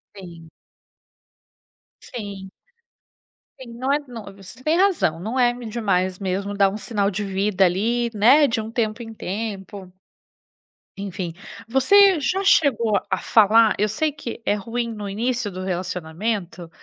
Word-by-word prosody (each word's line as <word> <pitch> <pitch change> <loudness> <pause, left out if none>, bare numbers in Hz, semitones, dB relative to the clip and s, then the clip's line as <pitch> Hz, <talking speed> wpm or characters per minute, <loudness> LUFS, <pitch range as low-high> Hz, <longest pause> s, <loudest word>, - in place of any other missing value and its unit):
Sim. 170 -4 -12 1.5
Sim. 200 -5 -8 1.1
Sim, 245 -3 -11
não 255 +3 -2
é 290 - +2
não 230 -4 -8
você 200 +6 -14
tem 315 +3 +2
razão, 360 - +2
não 220 +8 -4
é 245 -1 +5
eme 245 0 -6
demais 190 -5 -1
mesmo 195 +1 -3
dar 200 -1 +3
um 200 - -5
sinal 205 -2 -1
de 205 +3 -3
vida 195 0 +1
ali, 230 +7 0
né, 255 +8 +5
de 230 -1 -1
um 220 +1 -7
tempo 230 0 -2
em 225 -1 -9
tempo. 200 -2 -6 1.1
Enfim. 190 -4 -5 0.3
Você 365 - +5
já 365 +8 -1
chegou 235 - +3
a - - +1
falar 220 0 +4
eu 210 - +2
sei 300 +9 0
que 265 -5 -8
é - - +2
ruim 230 +3 -3
no 210 -2 -6
início 235 +1 -2
do 185 0 -6
relacionamento, 180 0 -4
215 Hz, 145 wpm, -22 LUFS, 195-240 Hz, 1.5 s, é